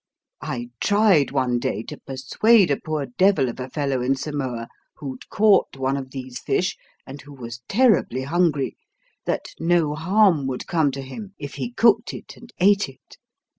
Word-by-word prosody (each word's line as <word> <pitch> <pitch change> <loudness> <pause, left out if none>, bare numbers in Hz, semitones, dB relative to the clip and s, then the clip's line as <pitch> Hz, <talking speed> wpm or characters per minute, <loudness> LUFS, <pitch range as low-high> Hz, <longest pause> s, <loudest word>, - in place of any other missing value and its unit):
I 120 0 -5
tried 205 - +4
one 130 -3 0
day 110 -2 -2
to - - -9
persuade 175 - +3
a 140 - +2
poor 155 -2 -2
devil 140 +1 +2
of 120 - -8
a 130 +1 -5
fellow 140 -2 -1
in 130 +2 +1
Samoa 130 -5 -4 0.3
who'd 130 -3 -8
caught 205 -8 +3
one 135 +1 0
of 135 -2 -5
these 130 -2 -7
fish, 180 - 0 0.3
and 135 +1 -9
who 145 - -14
was 120 -2 -8
terribly 205 - +3
hungry, 155 -2 0 0.5
that - - -2
no 165 -2 +2
harm 170 -2 +3
would 130 -1 -4
come 160 -4 +2
to 135 0 -5
him 195 +9 -9
if 145 -2 -7
he 240 - -4
cooked 230 -1 +3
it - - -10
and 240 0 -15
ate 200 -2 +4
it. 135 - -18
145 Hz, 170 wpm, -23 LUFS, 130-190 Hz, 0.5 s, tried